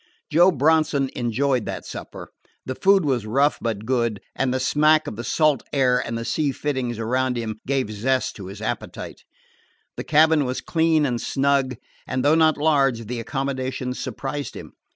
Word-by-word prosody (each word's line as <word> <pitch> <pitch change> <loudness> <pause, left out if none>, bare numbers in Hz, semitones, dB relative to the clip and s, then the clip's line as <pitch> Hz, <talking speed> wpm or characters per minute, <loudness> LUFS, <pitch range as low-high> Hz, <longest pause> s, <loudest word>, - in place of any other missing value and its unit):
Joe 175 +4 +6
Bronson 155 -2 +2
enjoyed 125 +1 0
that - - -5
supper. - - -8 0.4
The 130 - -3
food 195 +4 +3
was 125 -6 0
rough 140 +6 +2
but 110 -2 -3
good, 115 -4 0 0.2
and 135 -1 0
the 130 - 0
smack 155 +4 +3
of - - -5
the 120 - -6
salt 150 +3 +2
air 130 -3 +3
and 115 - -4
the 115 - -5
sea 145 +3 0
fittings 130 -5 -3
around 125 +2 0
him 110 -2 -4
gave 135 -5 0
zest 130 +5 -1
to 95 -3 -8
his 100 +3 -9
appetite. 110 - -5 0.8
The - - -4
cabin 155 0 +4
was 125 0 -2
clean 160 -2 +2
and 120 -3 -1
snug, 135 -2 +1 0.3
and, 130 +1 -2
though 145 - +5
not 160 -1 +4
large, 135 -6 +2
the 120 +2 -4
accommodations 130 0 -3
surprised 140 +1 -5
him. - - -10
130 Hz, 175 wpm, -23 LUFS, 120-150 Hz, 0.8 s, Joe